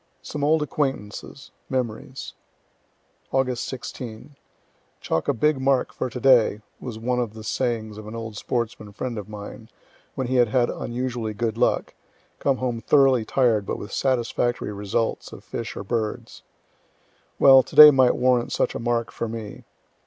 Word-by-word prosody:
SOME 145 - -5
OLD 155 +1 +3
ACQUAINTANCES 135 -3 -4 0.2
MEMORIES 130 0 -4 1.0
Aug. 130 -1 +1
16. 125 +1 -7 0.6
"Chalk 80 - -2
a 145 - +3
big 150 +2 +1
mark 135 -1 +1
for - - -3
today," 125 -4 +3 0.2
was 120 -4 -7
one 125 +2 -1
of 115 -3 -3
the 110 - -9
sayings 110 -2 -2
of 105 - -10
an 110 - -7
old 115 -2 -6
sportsman 110 -2 -3
friend 120 +1 -4
of 105 0 -9
mine, 105 +1 -9 0.5
when 130 - -2
he 130 +1 0
had 120 -1 +5
had 120 +2 +1
unusually 120 -3 -4
good 115 +1 -1
luck - - 0 0.5
come 135 -2 +1
home 120 -2 -2
thoroughly 135 -4 +4
tired, 115 -4 +2
but - - -4
with 105 - -8
satisfactory 120 -3 -1
results 105 +3 -2
of - - -11
fish - - -6
or - - -5
birds. 110 0 -4 1.0
Well, 135 -1 +8
to - - -12
day 150 0 +12
might 130 -3 +4
warrant 125 -1 +2
such - - 0
a - - -4
mark 115 0 -1
for 115 - -4
me. 110 -2 -7
120 Hz, 160 wpm, -24 LUFS, 110-130 Hz, 1.0 s, day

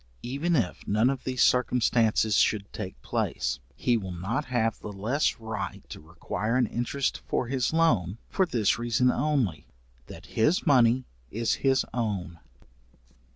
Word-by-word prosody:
Even 145 +8 -1
if 115 - -1
none 110 +5 +3
of 135 -2 -6
these 130 -1 +1
circumstances 115 -4 +2
should 100 -2 +1
take 95 -9 -6
place, 65 0 -2 0.2
he 120 -2 +1
will 95 -4 -5
not 95 +7 -3
have 115 -3 0
the 105 - -7
less 115 +10 0
right 110 -3 -5
to - - -8
require 85 +8 -3
an 125 - +3
interest 120 +4 -2
for - - 0
his 130 -2 0
loan, 115 - +2
for 190 -2 +1
this 115 -8 +1
reason 120 +2 +2
only, 140 - -1 0.4
that - - -11
his 150 +11 +1
money 125 -2 +4 0.2
is 115 +1 0
his 135 -1 +3
own. 100 -8 -3
115 Hz, 150 wpm, -27 LUFS, 105-130 Hz, 0.4 s, money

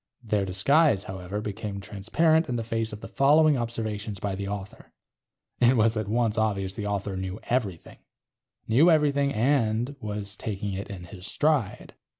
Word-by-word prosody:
Their 105 -3 0
disguise, 110 - +3
however, 95 +2 -5
became 105 -1 -5
transparent 145 - +1
in 125 - -1
the 115 - -2
face 115 0 -2
of 105 0 -8
the - - -7
following 150 +6 +4
observations 110 -4 -3
by 100 0 -2
the 100 +1 -4
author. 100 0 -7 0.7
It 125 +1 +5
was 110 +1 +3
at 110 -2 -2
once 115 0 +1
obvious 100 -3 0
the 105 0 -4
author 100 -1 -2
knew 95 +2 -4
everything. 105 -10 -3 0.7
Knew 135 +10 +5
everything 145 -3 +3
and 120 0 +1
was 105 -2 -4
taking 100 -2 -4
it 95 +1 -5
in 95 -3 -7
his 90 +2 -9
stride. 145 -9 0
110 Hz, 160 wpm, -26 LUFS, 100-125 Hz, 0.7 s, It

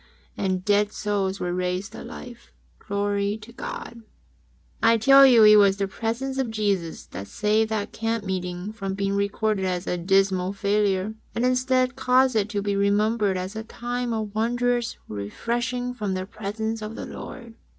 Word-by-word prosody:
And 185 -2 -1
dead 205 0 +3
souls 200 -2 -1
were 175 0 -2
raised 180 +3 -2
to - - -9
life! 240 -1 -10 0.3
Glory 200 0 -1
to 220 +2 -13
God! 235 0 -7 0.8
I 230 0 +5
tell 275 +4 +8
you 235 -4 +7
it 210 0 +9
was 200 -1 +5
the 200 -1 -1
presence 235 +7 -3
of 260 -3 0
Jesus 200 -6 -1
that 95 +3 -8
saved 215 - +1
that 215 -2 -2
camp 225 -1 -2
meeting 185 +1 -4
from 195 -3 -4
being 195 0 -1
recorded 200 0 0
as 180 0 -1
a 180 - -2
dismal 190 +1 +2
failure, 200 0 +1 0.2
and 240 - +1
instead 255 0 +2
caused 255 0 +3
it 210 -1 +1
to 205 -3 -2
be 200 -1 0
remembered 205 0 +2
as 185 +3 -5
a 220 - -4
time 245 +2 -4
of 215 -2 -3
wondrous 240 +1 0
"refreshing 240 - -3
from 210 -6 -3
the 185 0 -3
presence 220 +2 -4
of 215 +1 -6
the - - -6
Lord. 235 -3 -9
210 Hz, 170 wpm, -25 LUFS, 195-230 Hz, 0.8 s, it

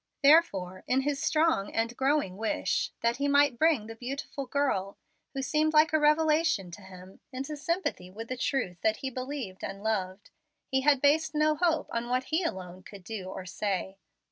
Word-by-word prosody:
Therefore 200 - +4
in 260 +1 +2
his 280 0 -2
strong 310 -10 +1
and 230 +1 0
growing 270 -8 +1
wish 225 +9 -1
that 235 0 +1
he 285 +1 0
might 285 -3 +3
bring 315 -9 +3
the 225 - -8
beautiful 270 +3 -6
girl, 250 -9 -1 0.4
who 270 - -2
seemed 310 +3 +1
like 305 0 +5
a 315 - +4
revelation 305 - +2
to 205 - -10
him, 185 0 -13
into 270 +3 -5
sympathy 295 - -2
with 225 +5 -8
the 255 - -3
truth 245 -8 -1
that 220 0 +2
he 265 - -4
believed 255 -7 -6
and 195 +1 -6
loved, 200 -3 -2 0.3
he 265 0 0
had 280 -1 +3
based 310 +2 +3
no 305 0 +3
hope 325 -1 +1
on 235 +1 -3
what 255 +1 +1
he 325 - +3
alone 185 - -5
could 195 0 -12
do 205 -1 -6
or 185 0 -7
say. 190 0 -3
255 Hz, 185 wpm, -29 LUFS, 195-300 Hz, 0.4 s, like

